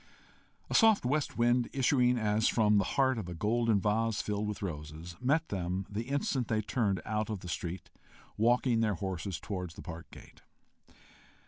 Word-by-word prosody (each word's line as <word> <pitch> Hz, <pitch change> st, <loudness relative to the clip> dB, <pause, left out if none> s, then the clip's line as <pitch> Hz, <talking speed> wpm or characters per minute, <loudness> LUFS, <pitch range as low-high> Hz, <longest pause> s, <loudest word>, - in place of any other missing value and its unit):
A -, -, -5 dB
soft 220 Hz, -, +5 dB
west 145 Hz, +3 st, 0 dB
wind, 120 Hz, 0 st, +2 dB
issuing 125 Hz, -2 st, +3 dB
as 110 Hz, -1 st, +2 dB
from 105 Hz, -2 st, +4 dB
the -, -, +2 dB
heart 130 Hz, -3 st, +3 dB
of 90 Hz, -5 st, -6 dB
a 90 Hz, -, -5 dB
golden 110 Hz, +3 st, +2 dB
vase 110 Hz, +2 st, 0 dB
filled 105 Hz, 0 st, -2 dB
with 105 Hz, -1 st, -4 dB
roses, 80 Hz, 0 st, -6 dB
met 150 Hz, +6 st, +1 dB
them 95 Hz, 0 st, -2 dB
the 110 Hz, +3 st, -3 dB
instant 140 Hz, -3 st, 0 dB
they 110 Hz, -1 st, 0 dB
turned 100 Hz, -4 st, 0 dB
out 110 Hz, +1 st, -1 dB
of 105 Hz, -4 st, -4 dB
the -, -, -8 dB
street, 85 Hz, +1 st, -5 dB, 0.4 s
walking 120 Hz, +1 st, +3 dB
their 110 Hz, -3 st, +1 dB
horses 95 Hz, -1 st, -4 dB
towards 90 Hz, -4 st, -5 dB
the -, -, -10 dB
park 85 Hz, -2 st, -8 dB
gate. -, -, -15 dB
105 Hz, 175 wpm, -31 LUFS, 95-120 Hz, 0.4 s, soft